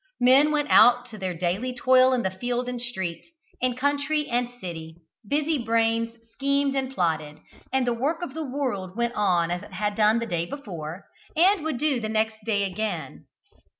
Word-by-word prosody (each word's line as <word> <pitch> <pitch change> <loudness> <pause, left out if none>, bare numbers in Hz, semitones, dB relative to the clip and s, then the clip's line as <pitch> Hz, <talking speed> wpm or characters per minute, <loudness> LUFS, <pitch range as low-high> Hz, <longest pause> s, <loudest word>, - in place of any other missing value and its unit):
Men 265 +4 +5
went 295 -1 0
out 245 0 +6
to 215 - -9
their 185 -2 -3
daily 185 +9 -2
toil 255 +1 +5
in 245 -6 +1
field 245 0 -1
and 250 -1 -4
street, 190 -9 -4 0.4
in 250 -1 0
country 285 +3 0
and 245 0 0
city, 160 -4 -7 0.3
busy 300 +1 +1
brains 230 0 +1
schemed 280 0 0
and 265 -1 -1
plotted, 160 - -1 0.3
and 265 -1 +1
the 240 - +1
work 300 +9 -1
of 280 - -5
the 320 +1 -4
world 250 -10 -3
went 235 0 0
on 175 -6 +1
as 175 0 -2
it - - -13
had 210 0 -1
done 215 +1 +3
the 235 - -1
day 170 -6 -2
before, 175 - -7 0.3
and 365 +2 +4
would 310 -5 -2
do 290 -2 +1
the 215 -2 -4
next 220 0 0
day 205 -2 +1
again. 205 +3 -4
240 Hz, 185 wpm, -25 LUFS, 200-270 Hz, 0.4 s, out